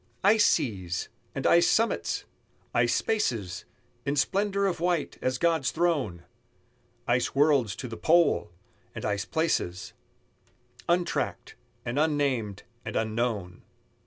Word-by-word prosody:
Ice 210 +2 +5
seas! 95 -7 -1 0.3
and - - -3
ice 170 0 +5
summits! 230 +1 +1 0.5
ice - - +3
spaces 115 - -1 0.4
In 140 +1 -1
splendor 200 +8 +1
of 185 -4 0
white, 175 -3 -1
as 130 0 0
God's 165 -3 +2
throne! 145 - 0 0.8
Ice 120 +2 +1
worlds 140 - +3
to 125 - -6
the 115 - -6
pole! 165 -9 +3 0.5
and - - -5
ice 100 -1 -1
places 155 - -1 1.0
Untracked, 175 0 0 0.3
and 120 +4 -1
unnamed, 140 -10 0 0.2
and 110 - -6
unknown! 110 -5 -2
135 Hz, 115 wpm, -28 LUFS, 105-170 Hz, 1.0 s, Ice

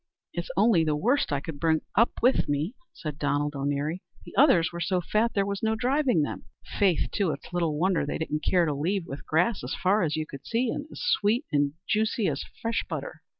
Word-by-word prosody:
"It's - - -4
only 200 -8 +5
the 155 -1 +1
worst 240 - +1
I 145 - +1
could 150 -2 -7
bring 160 0 +2
up 230 +3 +4
with 250 - +3
me," 145 - 0 0.2
said 150 -2 -7
Donald 145 0 0
O'Neary; 145 +5 -2 0.2
"the - - -11
others 190 - +5
were 170 - -6
so 185 +1 +1
fat, 215 +6 0
there 200 -1 +2
was 200 0 -3
no 220 0 +1
driving 250 - +2
them. - - -5 0.3
Faith, 190 -5 +2
too, 200 -5 +1
it's 150 +3 -6
little 165 -4 0
wonder 185 +2 +2
they 145 - -2
didn't 155 -1 -3
care 180 -2 +3
to 150 - 0
leave, 170 +6 -1
with 140 -4 -8
grass 175 +7 +1
as - - -3
far 195 +3 +2
as 155 -4 0
you 155 0 -2
could 140 -2 -10
see, 235 - 0
and 295 - -4
as - - -9
sweet 240 +2 +2
and 145 -1 +2
juicy 220 -1 +1
as 140 -3 -1 0.2
fresh 230 0 0
butter." - - -5
175 Hz, 220 wpm, -27 LUFS, 150-220 Hz, 0.3 s, only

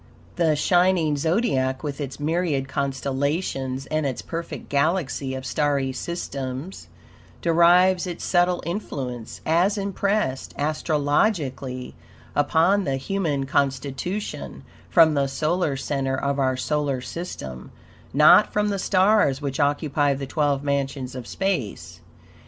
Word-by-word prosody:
The 165 -3 +2
shining 175 -1 +3
Zodiac, 140 - 0
with 145 -1 -4
its 140 0 -5
myriad 155 -3 0
constellations 135 0 -2
and 155 +2 -1
its 135 -3 -3
perfect 170 0 -6
galaxy 140 -3 0
of 130 0 -6
starry 140 -1 0
systems, 140 +1 -5 0.6
derives 175 +2 +4
its 175 - -6
subtle 175 0 +2
influence, 130 - -5
as 175 +6 +2
impressed 200 -7 -1
astrologically 145 - 0 0.4
upon 170 +7 +3
the 135 -5 -1
human 145 -2 -1
constitution, 140 +8 -2 0.3
from 160 -2 +6
the 140 -1 +1
solar 155 +1 0
center 135 -1 -1
of 140 0 -1
our 130 -1 +1
solar 145 0 -1
system, 65 - -7 0.4
NOT 150 +8 +6
FROM 210 0 +1
THE 200 -1 -1
STARS 190 -7 +3
which 140 0 -4
occupy 145 0 +1
the 135 0 -5
twelve 145 0 0
mansions 135 -2 -2
of 125 -2 -7
space. 105 - -3
145 Hz, 115 wpm, -24 LUFS, 135-175 Hz, 0.6 s, from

